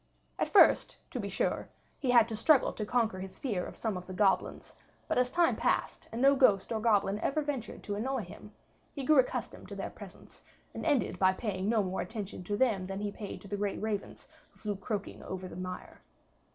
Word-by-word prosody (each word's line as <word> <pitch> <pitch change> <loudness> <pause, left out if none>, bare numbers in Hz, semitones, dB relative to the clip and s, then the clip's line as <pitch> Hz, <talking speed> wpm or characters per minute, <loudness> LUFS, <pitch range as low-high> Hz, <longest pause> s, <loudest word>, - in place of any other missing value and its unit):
At - - 0
first, - - +5
to - - -3
be - - -3
sure, - - -1 0.3
he 265 - -2
had 235 -2 +6
to 220 - -3
struggle 270 +5 +4
to 210 - -4
conquer 225 -6 +1
his 190 0 -8
fear 205 -10 -2
of - - -8
some 220 -4 -2
of 180 - -8
the 185 - -6
goblins; 195 0 +1 0.3
but - - +1
as 250 0 +2
time 345 +4 +3
passed - - -1
and 230 - -4
no 275 +2 +6
ghost 205 -8 +4
or 225 - 0
goblin 205 -2 +2
ever 300 +6 0
ventured 275 -6 -4
to 205 - -3
annoy 245 +3 -1
him, 205 +3 -12 0.4
he 280 - -4
grew 300 0 +6
accustomed 255 - -1
to - - -6
their - - -4
presences - - -13 0.3
and - - -4
ended 285 -6 +1
by 190 0 +5
paying 195 -1 -2
no 220 -2 +3
more 185 0 -2
attention 205 -5 -6
to 205 +2 -1
them 205 -8 +2
than 195 +1 -4
he 205 -1 -2
paid 205 -1 -7
to 200 - -11
the 205 +1 -3
great 200 -1 -2
ravens 210 -2 -4 0.3
who - - -25
flew 210 -1 -3
croaking 200 +1 -4
over 185 0 -6
the - - -10
mire. 185 0 -7
210 Hz, 220 wpm, -31 LUFS, 195-245 Hz, 0.4 s, had